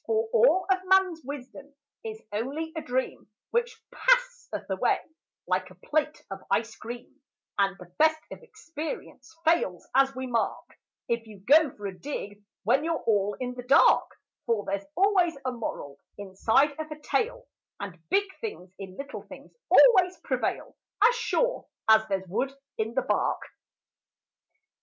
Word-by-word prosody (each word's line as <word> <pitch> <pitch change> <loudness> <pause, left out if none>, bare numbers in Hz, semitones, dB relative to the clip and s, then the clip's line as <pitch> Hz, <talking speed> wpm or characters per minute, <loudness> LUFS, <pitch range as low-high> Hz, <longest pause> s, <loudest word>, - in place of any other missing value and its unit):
For 445 0 +1
all 470 -6 +5
of 375 - +3
man's 370 -3 +3
wisdom 280 +1 -9 0.3
is 440 -1 -7
only 280 +10 -3
a 320 - -3
dream, 255 -6 -3 0.2
Which 465 -1 -1
passeth - - +1
away - - +1 0.5
like 185 +1 0
a 185 - -15
plate 300 - -2
of 195 0 -6
ice 225 0 0
cream, 240 +2 -9 0.4
And 195 -1 +2
the 180 -1 -14
best 315 0 +5
of - - -9
experience 325 - -8
fails, 315 - +1
as 270 0 +4
we 260 0 -4
mark, 235 -3 -2 0.3
If 235 -1 -1
you 210 -3 -13
go 295 +8 +6
for 205 -2 -4
to - - -14
dig 205 -4 -6 0.2
when 280 - +3
you're 330 0 -1
all 205 -2 +1
in 250 -1 -3
the 250 - -7
dark; 250 +3 +5 0.4
For 225 -3 +1
there's 200 0 -3
always 365 -4 +3
a 255 - 0
moral 145 - -6 0.2
inside 215 +8 +2
of 315 0 -4
a 305 0 -8
tale, - - -1 0.3
And 190 -4 -7
big 395 +4 +4 0.2
things 190 - -7
in 190 -1 -9
little 275 0 -6
things - - -13 0.2
always 370 -7 +6
prevail - - -2 0.3
As 480 - +7
sure - - 0 0.2
as 220 0 +6
there's 190 -1 -2
wood 240 +9 -1 0.2
in 225 +2 -3
the 265 - +2
bark. - - 0
270 Hz, 155 wpm, -27 LUFS, 210-345 Hz, 0.5 s, As